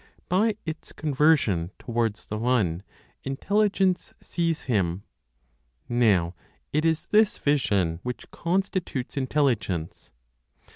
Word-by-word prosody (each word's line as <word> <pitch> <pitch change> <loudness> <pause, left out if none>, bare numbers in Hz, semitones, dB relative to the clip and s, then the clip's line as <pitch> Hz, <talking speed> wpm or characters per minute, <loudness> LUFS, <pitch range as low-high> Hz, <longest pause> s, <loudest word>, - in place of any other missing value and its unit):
By 205 +4 +3
its 160 -1 -6
conversion 140 - +2
towards 115 -3 -2
the 105 - -4
One, 110 -8 +1 0.4
Intelligence 195 +6 +1
sees 165 -2 -1
Him; 95 -6 0 0.8
now 105 -8 +3 0.4
it 155 +2 +2
is 160 -1 +1
this 215 0 +4
vision 100 - +1
which 125 +2 -6
constitutes 175 -7 -2
Intelligence. 130 - -1
130 Hz, 95 wpm, -26 LUFS, 105-165 Hz, 0.8 s, this